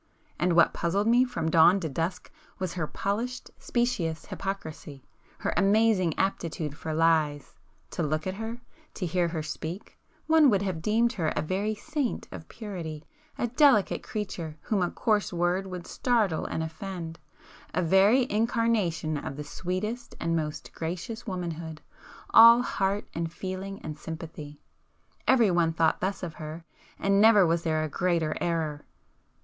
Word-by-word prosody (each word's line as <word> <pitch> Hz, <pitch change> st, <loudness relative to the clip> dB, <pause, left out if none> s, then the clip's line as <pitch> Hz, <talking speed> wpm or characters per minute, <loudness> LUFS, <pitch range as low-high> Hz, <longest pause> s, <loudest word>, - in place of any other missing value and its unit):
And 175 Hz, 0 st, +2 dB
what 170 Hz, 0 st, +5 dB
puzzled 195 Hz, +5 st, 0 dB
me 240 Hz, +3 st, +5 dB
from 160 Hz, -10 st, -2 dB
dawn 170 Hz, +4 st, +6 dB
to 165 Hz, -, -2 dB
dusk 165 Hz, +5 st, -3 dB, 0.3 s
was 185 Hz, -3 st, -3 dB
her 165 Hz, -4 st, -2 dB
polished, 230 Hz, +9 st, -3 dB
specious 185 Hz, -10 st, -1 dB
hypocrisy,—her 160 Hz, -8 st, -6 dB
amazing 200 Hz, -4 st, +3 dB
aptitude 165 Hz, -6 st, -2 dB
for 160 Hz, -, -5 dB
lies! 155 Hz, -2 st, +1 dB, 0.4 s
To -, -, -3 dB
look 155 Hz, 0 st, -1 dB
at 185 Hz, -, -2 dB
her,—to 230 Hz, +3 st, -7 dB
hear 175 Hz, +1 st, +1 dB
her 165 Hz, -2 st, -3 dB
speak,—one 210 Hz, -, 0 dB
would 200 Hz, -3 st, +2 dB
have 185 Hz, -5 st, -3 dB
deemed 230 Hz, +6 st, +2 dB
her 170 Hz, -8 st, -1 dB
a -, -, 0 dB
very 200 Hz, +6 st, -1 dB
saint 290 Hz, +2 st, -3 dB
of 160 Hz, -, -9 dB
purity,—a 200 Hz, -, -6 dB
delicate 250 Hz, -4 st, +4 dB
creature 175 Hz, -7 st, -5 dB
whom 210 Hz, -4 st, 0 dB
a 175 Hz, -, +1 dB
coarse 210 Hz, -3 st, 0 dB
word 175 Hz, +2 st, 0 dB
would 180 Hz, -2 st, -7 dB
startle 220 Hz, -10 st, 0 dB
and 160 Hz, -, -2 dB
offend,—a 165 Hz, 0 st, -7 dB
very 195 Hz, +9 st, +5 dB
incarnation 215 Hz, -, 0 dB
of 135 Hz, -, -6 dB
the 150 Hz, -, -4 dB
sweetest 185 Hz, +10 st, -4 dB
and 165 Hz, 0 st, 0 dB
most 150 Hz, -2 st, -4 dB
gracious 185 Hz, +9 st, -5 dB
womanhood,—all 180 Hz, +6 st, +3 dB
heart 195 Hz, -2 st, -1 dB
and 165 Hz, -1 st, -3 dB
feeling 190 Hz, +2 st, -5 dB
and 155 Hz, -1 st, -6 dB
sympathy. 155 Hz, -3 st, -8 dB, 0.7 s
Everyone 175 Hz, -9 st, +4 dB
thought 160 Hz, 0 st, +1 dB
thus 190 Hz, +1 st, -2 dB
of 170 Hz, -3 st, -4 dB
her,—and 165 Hz, +5 st, -3 dB
never 215 Hz, -3 st, +7 dB
was 165 Hz, 0 st, +1 dB
there 155 Hz, -2 st, 0 dB
a -, -, -1 dB
greater 165 Hz, -1 st, 0 dB
error. 160 Hz, -3 st, -1 dB
180 Hz, 140 wpm, -28 LUFS, 160-210 Hz, 0.7 s, never